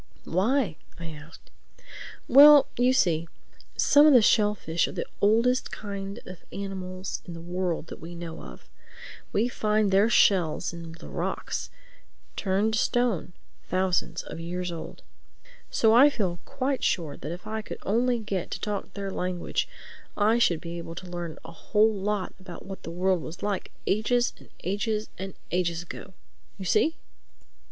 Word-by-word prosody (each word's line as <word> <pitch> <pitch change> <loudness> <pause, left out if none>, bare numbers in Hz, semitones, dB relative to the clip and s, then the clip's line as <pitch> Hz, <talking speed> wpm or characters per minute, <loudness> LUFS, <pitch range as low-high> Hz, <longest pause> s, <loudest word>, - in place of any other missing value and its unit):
"Why?" 200 - +1 0.2
I 165 -1 -6
asked. 155 +1 -13 0.8
"Well, 290 +2 +9
you 250 +1 +3
see, 170 -10 +2 0.5
some 290 +1 +6
of 300 - +7
the 245 - +8
shellfish 205 -7 +2
are - - -6
the - - -3 0.2
oldest 230 +5 +3
kind 200 +1 -6
of 185 -2 -10
animals 190 -1 -5
in 175 - -7
the - - -7
world 175 -1 -2
that - - -10
we 170 +2 -8
know 170 -1 -7
of. 60 -2 -12 0.6
We 220 +4 +2
find 215 -3 +1
their 200 +4 +5
shells 180 -8 +3
in 170 -1 -8
the 165 - -12
rocks—turned 220 - -4
to 220 - +2
stone—thousands 185 -5 -1
of - - -8
years 175 +1 -3
old. 165 -1 -8 0.7
So 220 0 +4
I 265 +5 +8
feel 185 -10 -2
quite 275 0 -2
sure 160 -6 0
that 150 - -6
if 175 +4 -7
I 220 +1 -3
could - - -7
only 240 +4 +2
get 200 -5 -3
to - - -4
talk 200 -2 -4
their 200 -1 -4
language, 180 -1 -2 0.5
I 220 +3 +3
should 170 -8 +3
be 170 0 -6
able 165 0 -7
to 180 +1 -8
learn 175 -2 -5
a 165 - -8
whole 215 +6 +2
lot 200 -1 -2
about 185 -2 -10
what 195 0 -8
the - - -7
world 180 +1 +1
was 160 +2 -8
like 205 -2 -2 0.2
ages 240 +4 +1
and - - -17
ages 210 +3 -1
and 190 0 -6 0.2
ages 170 -1 0
ago. 175 - -9 0.4
You 190 - -7
see?" 320 - +3
195 Hz, 160 wpm, -27 LUFS, 175-220 Hz, 0.8 s, Well